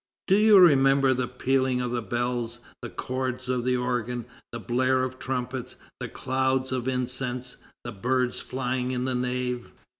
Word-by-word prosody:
Do 190 - +4
you 210 0 +7
remember 135 -6 +6
the 130 -1 -1
pealing 130 0 +1
of 125 -1 -2
the 120 -1 -1
bells, 120 +1 -2 0.2
the - - -5
chords 130 0 -3
of 125 -1 0
the 125 0 +1
organ, 125 -1 -2 0.3
the 120 - -5
blare 130 +3 +1
of 130 0 -4
trumpets, 125 -1 -4 0.2
the - - -5
clouds 130 0 0
of 130 -1 -2
incense, 125 -1 -2 0.3
the 120 - -5
birds 125 +4 0
flying 125 -1 -2
in 125 0 -1
the 130 - -1
nave? 125 0 -2
125 Hz, 160 wpm, -26 LUFS, 125-130 Hz, 0.3 s, you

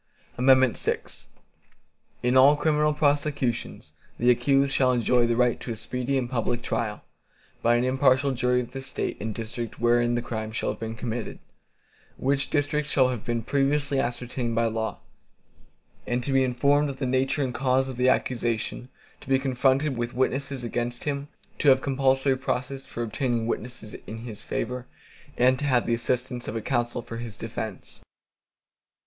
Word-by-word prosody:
VI 130 -1 +5 1.5
In 125 +1 +2
all 135 +3 +7
criminal 150 0 +2
prosecutions, 145 -4 -1 0.2
the 120 +1 +4
accused 135 +2 +2
shall 130 -1 +3
enjoy 120 0 +3
the 120 - +1
right 125 0 +2
to 120 - -6
a - - -3
speedy 125 +4 -2
and 125 -2 -1
public 120 -1 -1
trial, 105 -3 -2 0.6
by 120 +1 +4
an 120 - +2
impartial 130 +1 +3
jury 125 0 +1
of 120 - -8
the 135 +1 -6
State 135 - -3
and 110 0 -3
district 115 +1 -5
wherein 120 0 +3
the 120 - 0
crime 110 -2 -4
shall 110 - -1
have - - -8
been 115 0 -4
committed, 115 0 -4 0.8
which 135 +1 0
district 145 0 0
shall 130 -3 +3
have 125 -4 -4
been 115 -1 -2
previously 140 +2 +1
ascertained 120 -1 -2
by 115 +1 +2
law, 110 0 -2 1.1
and 120 +1 0
to 135 - -1
be 135 0 +4
informed 140 +3 +2
of 135 - -6
the 135 - -2
nature 130 +2 +1
and 125 -2 -2
cause 130 +1 +1
of 130 -2 -6
the 125 +1 +4
accusation; 120 -1 -1 0.3
to - - -14
be 135 - +5
confronted 135 +2 +1
with 120 0 -3
the - - -14
witnesses 135 +1 -1
against 120 +1 -3
him; 140 -1 -2 0.3
to 145 - +4
have 130 -1 +6
compulsory 135 0 +2
process 130 +1 -3
for 120 - -4
obtaining 120 0 -1
witnesses 115 -1 -5
in 110 - -6
his 115 -2 -8
favor, 125 0 -4 0.5
and 130 +1 +4
to 145 - -1
have 125 -4 +2
the 120 - +1
assistance 125 +1 -2
of 115 -2 -3
counsel 120 -1 -1
for 115 - -7
his 115 -3 -7
defense. 110 -3 -6
125 Hz, 170 wpm, -26 LUFS, 120-135 Hz, 1.5 s, all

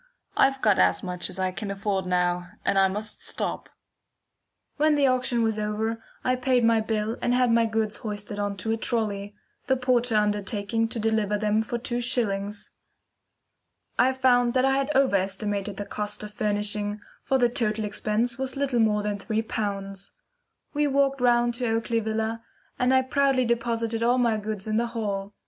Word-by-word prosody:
"I've 270 0 +3
got 210 -3 +4
as - - +3
much 180 -1 -1
as - - -9
I 185 -1 0
can 200 +3 -5
afford 200 -1 -2
now, 180 0 0 0.2
and 195 - +3
I 195 - +5
must 210 +3 -4
stop." - - -3 1.1
When 305 0 +3
the 285 -1 +3
auction 255 -2 +2
was 220 -1 0
over, 220 +2 -2 0.2
I 255 - +2
paid 250 -1 +2
my 230 -1 +4
bill 220 0 -2
and 245 - +2
had 250 -1 +3
my 230 0 +4
goods 220 -1 -1
hoisted 205 -1 -5
on 205 -1 -2
to 220 +4 -3
a 225 - +1
trolly, 205 -3 -2 0.3
the 265 -1 +3
porter 245 -2 +1
undertaking 210 +1 0
to 225 - -3
deliver 215 -2 +1
them 210 +1 +1
for 230 +2 -3
two 240 0 -3
shillings. 205 -4 -1 1.3
I 260 - +5
found 245 -2 +3
that 255 0 +4
I 270 0 +3
had 275 +1 0
over 265 -6 +4
estimated 200 +1 -3
the 205 - -4
cost 210 +1 -4
of 210 0 -8
furnishing, 210 0 0 0.2
for 270 -1 +1
the 245 -2 +4
total 220 -3 -1
expense 215 +4 -1
was 265 +1 -3
little 270 -3 0
more 210 -2 +2
than 205 -1 -2
three 220 +2 -1
pounds. 195 -3 -4 0.6
We 295 0 +2
walked 275 -1 +1
round 240 -1 +3
to 245 +1 -2
Oakley 230 +1 0
Villa, 220 +1 -2 0.4
and 250 +1 +3
I 260 0 +4
proudly 270 -1 +2
deposited 230 -1 -1
all 240 +2 +3
my 235 -3 +2
goods 215 -1 -5
in 215 0 0
the 235 +1 +1
hall. 205 -3 -4
220 Hz, 180 wpm, -26 LUFS, 205-245 Hz, 1.3 s, I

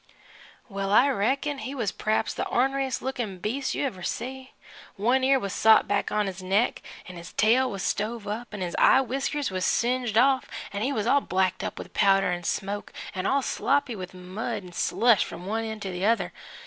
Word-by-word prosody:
Well, 195 -3 -3
I 250 +7 +6
reckon 270 +5 0
he 270 +1 -5
was 225 -7 -1
p'raps 215 0 -1
the - - -3
orneriest 270 +1 0
lookin' 240 -7 -3
beast 240 +9 -2
you - - -1
ever 190 -9 -4
see. 260 +7 -5 0.4
One 245 +6 +2
ear 270 +1 +5
was 200 -5 -4
sot 220 0 +5
back 205 - 0
on 210 0 +1
his 190 -1 -5
neck, 195 +6 +1 0.3
'n' 180 -1 -9
his 170 +1 -10
tail 250 +4 +3
was 195 -4 -5
stove 220 +1 -2
up, 225 +3 -5
'n' 205 -3 -6
his 175 -2 -3
eye 265 - +6
winkers 270 +1 -2
was 185 -1 -2
singed 240 0 +1
off, 260 +1 +3 0.2
'n' 200 - -3
he 260 +5 0
was 220 -6 -1
all 280 +4 +4
blacked 185 -2 0
up - - -4
with - - -9
powder 195 -2 +3
an' 175 0 -3
smoke, 205 +3 -3 0.2
an' 185 - -2
all 275 0 +2
sloppy 270 -2 0
with 185 -2 -8
mud 200 +4 -5
'n' 180 - -12
slush 230 +3 +3
f'm 175 - -8
one 220 +3 -1
end 220 -1 -6
to 190 - -4
the 180 +1 -4
other. 230 +2 +1
220 Hz, 205 wpm, -26 LUFS, 195-260 Hz, 0.4 s, I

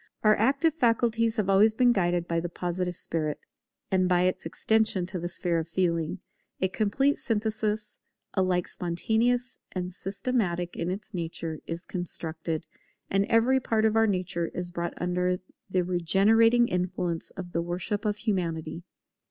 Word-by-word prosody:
Our 215 0 +6
active 275 +8 +2
faculties 230 -4 +2
have 210 -3 +1
always 205 +3 +5
been 245 0 +5
guided 175 -5 +1
by 170 0 +1
the 170 +1 -3
Positive 180 +1 -2
spirit: 155 -3 -2 0.5
and 185 -1 +3
by 180 -1 +4
its 185 -2 0
extension 215 0 +1
to 185 0 -5
the 175 - -3
sphere 175 -1 -1
of 160 - -4
Feeling, 170 0 0 0.4
a 190 - +1
complete 235 +9 +1
synthesis, 215 -1 -1 0.3
alike 185 -2 +1
spontaneous 230 +8 0
and 180 -1 -3
systematic 190 -3 -2
in 170 - -2
its 205 +4 -5
nature, 165 -2 -4
is 170 +2 -5
constructed; 165 -2 -4 0.5
and 195 +1 +3
every 245 +4 +4
part 220 -3 +1
of 220 0 +3
our 225 0 +5
nature 180 -3 -1
is 175 -1 -4
brought 170 0 -3
under 180 0 0 0.3
the 185 -1 +1
regenerating 205 +7 +4
influence 180 -2 -2
of 180 -2 -6
the 170 - 0
worship 180 +5 -2
of 210 -1 0
Humanity. 170 -7 -2
185 Hz, 150 wpm, -28 LUFS, 175-220 Hz, 0.5 s, Our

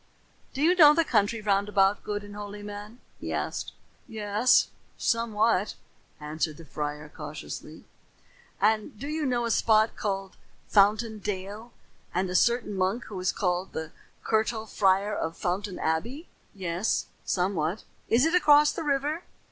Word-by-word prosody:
"Do 275 - -1
you 345 +3 +5
know 300 -4 +8
the 330 0 +3
country 215 -1 +1
round 200 -1 +1
about, 195 0 +3
good 205 -1 -3
and 205 0 -10
holy 205 0 -7
man?" 205 +3 -9 0.2
he - - -5
asked. - - -3 0.3
"Yes, 215 +1 +2 0.3
somewhat," 225 -3 +1 0.4
answered 155 0 -3
the 165 - -12
friar 150 +1 -5
cautiously. 150 - -8 0.7
"And 215 +1 +1
do 280 - -5
you 305 -1 -1
know 240 -2 0
a 230 - -1
spot 220 0 +3
called 195 -2 -3 0.3
Fountain 215 +2 +3
Dale, 205 +3 -5 0.4
and 185 +1 +1
a - - -3
certain 235 0 +2
monk 190 +5 0
who 195 -3 -6
is 185 - +1
called 180 -1 -1
the 160 0 -5 0.3
Curtal 220 0 0
Friar 200 0 +2
of 165 -3 -3
Fountain 185 +2 -2
Abbey?" 235 - -2 0.3
"Yes, 185 +1 -1 0.2
somewhat." 180 0 -1 0.3
"Is 245 +5 +4
it 325 - +1
across 300 -4 +6
the - - -5
river?" 295 +3 0
205 Hz, 150 wpm, -27 LUFS, 185-230 Hz, 0.7 s, know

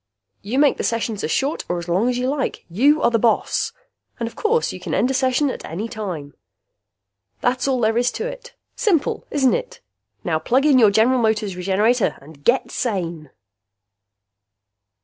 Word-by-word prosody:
You 220 +6 -3
make 285 -1 +4
the - - -3
sessions 225 -3 -2
as - - -1
short 275 - 0
or 175 - 0
as 170 0 -6
long 190 +8 +1
as 250 - -1
you 250 +1 -1
like. 275 0 -2
You 285 - +3
are 235 - +4
the 230 - +2
boss! 230 0 +1 0.5
And 230 - -2
of 230 - -9
course 460 +2 +1
you - - -8
can - - -3
end 255 - +2
a - - -1
session 260 +1 +1
at - - -8
any 195 +8 -4
time. 180 -11 -6 1.1
That's 250 +2 0
all 260 -2 +1
there 225 +1 +2
is 245 +1 +1
to 450 - -3
it! - - -8 0.2
Simple, 420 - 0
isn't 265 -3 +2
it? - - -4 0.4
Now 160 -2 0
plug 260 - +1
in 280 -4 +5
your 220 -3 +7
General 225 +5 +3
Motors 215 -4 0
Regenerator 200 +5 +1
and 145 0 -16
GET 245 - +2
SANE! 170 - -3
235 Hz, 185 wpm, -21 LUFS, 200-270 Hz, 1.1 s, your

